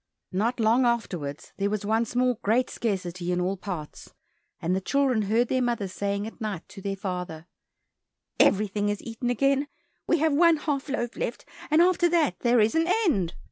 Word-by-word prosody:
Not 225 +6 0
long 230 +3 +4
afterwards, 180 -12 -2
there 200 0 0
was 210 0 -2
once 225 +3 0
more 250 -2 +2
great 235 +5 +1
scarcity 180 -5 -2
in 180 - 0
all 185 +2 0
parts, 180 -6 -7 0.5
and 175 +3 0
the 190 - -1
children 265 0 +1
heard 225 +4 +2
their 255 +2 +1
mother 235 -5 0
saying 200 +2 -2
at 225 +2 -10
night 210 -6 -4
to 195 - -11
their 195 0 -2
father, 180 -5 -5 0.9
"Everything 205 0 +3
is 205 -1 -3
eaten 230 +1 -4
again, 275 +3 +2 0.4
we 340 - +3
have 315 -1 +2
one 335 +2 +5
half 290 -2 -2
loaf 240 -4 -2
left, - - -4 0.2
and 315 +2 +5
after 350 -1 +3
that 330 -4 +1
there 240 0 +3
is 215 +1 +3
an 325 +1 +2 0.2
end. 190 - +1
220 Hz, 180 wpm, -26 LUFS, 195-255 Hz, 0.9 s, one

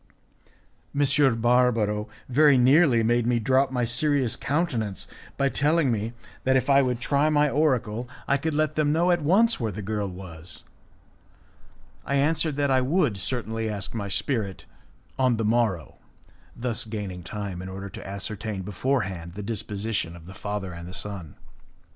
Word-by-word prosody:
M. 140 -4 +3
Barbaro 115 -3 +2 0.2
very 145 +1 +5
nearly 130 -1 +5
made 120 +1 +2
me 120 -1 +3
drop 130 +4 +2
my 125 -2 -1
serious 130 +1 +1
countenance 125 - -1 0.3
by 140 - +2
telling 145 0 +2
me 110 +1 -2 0.3
that 130 0 +3
if 130 +1 +2
I 140 0 +6
would 125 -2 0
try 145 +4 +2
my 150 -1 +3
oracle 125 -6 0 0.2
I 140 - +3
could 155 +2 -2
let 155 0 +1
them 150 -1 +1
know 170 +3 +3
at 175 -1 +2
once 205 +10 +4
where 115 -4 -1
the 105 +1 -6
girl 105 0 -2
was. 85 -3 -8 1.4
I 140 - -1
answered 155 +1 +1
that 140 -1 +1
I 130 -1 +4
would 140 - +1
certainly 115 +2 -2
ask 100 -2 -5
my 105 -3 -3
spirit 105 -3 -2 0.5
on 130 -3 +3
the 110 - -1
morrow, 110 -7 0 0.6
thus 120 -2 -1
gaining 105 -5 -5
time 95 0 -5
in 95 - -7
order 95 +1 -6
to - - -9
ascertain 100 0 -4
before 125 +8 0
hand 85 -4 -6
the 105 - -5
disposition 105 -4 -2
of 85 -2 -13
the 95 - -10
father 100 -1 -4
and 85 0 -8
of 90 - -8
his - - -6
son. 95 -8 -7
115 Hz, 165 wpm, -26 LUFS, 100-140 Hz, 1.4 s, I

